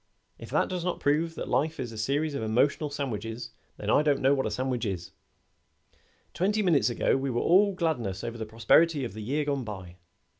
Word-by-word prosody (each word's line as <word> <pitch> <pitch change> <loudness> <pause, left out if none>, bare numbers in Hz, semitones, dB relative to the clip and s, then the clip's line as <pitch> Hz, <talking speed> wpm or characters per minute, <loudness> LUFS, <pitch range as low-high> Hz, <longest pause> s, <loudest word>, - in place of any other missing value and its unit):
If - - -9
that - - +2
does 180 -2 -3
not 180 0 -2
prove 160 +3 +1
life 160 +2 0
a 130 - -3
series 140 +8 -1
of 140 - -3
emotional 125 +7 +1
sandwiches, 115 -5 -4 0.3
then - - -2
I - - +5
don't 145 -2 +2
know 135 +2 +4
what 135 -4 0
a - - -1
sandwich 125 +2 -2
is. 95 -5 -4 1.2
Twenty 210 +4 +1
minutes 150 - +3
ago 120 - +1
we 135 0 -1
were 120 -1 0
all 195 +2 +4
gladness 120 - -1
over 115 0 -5
the 110 - -4
prosperity 135 +8 +3
of 115 - -6
the 110 - -7
year 145 +7 -1
gone 140 -2 -1
by. 95 -5 -8
135 Hz, 195 wpm, -28 LUFS, 110-155 Hz, 1.2 s, I